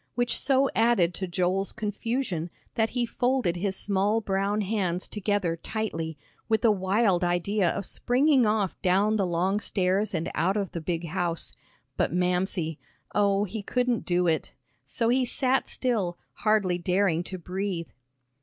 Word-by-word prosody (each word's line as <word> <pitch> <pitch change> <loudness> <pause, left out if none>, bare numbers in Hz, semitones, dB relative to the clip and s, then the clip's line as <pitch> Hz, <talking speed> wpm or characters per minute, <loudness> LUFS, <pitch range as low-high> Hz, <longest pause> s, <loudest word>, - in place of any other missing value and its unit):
Which 245 -1 +1
so 270 0 +3
added 225 -7 +3
to 190 - -3
Joel's 185 +2 0
confusion, 210 -4 -2 0.2
that 225 -1 +1
he 245 -1 0
folded 245 -7 0
his 190 +1 -1
small 205 +3 +1
brown 200 0 0
hands 185 -4 -1
together 205 -4 -1
tightly, 165 -5 -4 0.3
with 220 +2 +2
a 225 - +7
wild 190 -1 +2
idea 175 +2 +1
of 200 - -2
springing 260 +2 +3
off 210 -3 0
down 200 +4 +3
the 195 -3 +1
long 180 +4 +1
stairs 200 0 0
and 165 0 -2
out 190 +4 +1
of 200 -3 -2
the 170 - -5
big 170 +1 -2
house 170 -1 -1 0.4
but - - +1
Mamsie. 180 -2 0 0.3
Oh, 200 -1 +3
he 210 +2 -4
couldn't 245 +2 0
do 180 0 +1
it! 160 -3 0 0.3
So 230 - 0
he 255 +2 +3
sat 260 +1 +1
still, 210 -9 -1 0.2
hardly 205 -5 +1
daring 180 -1 +1
to 185 - -6
breathe. 180 -1 -4
195 Hz, 155 wpm, -27 LUFS, 180-220 Hz, 0.4 s, a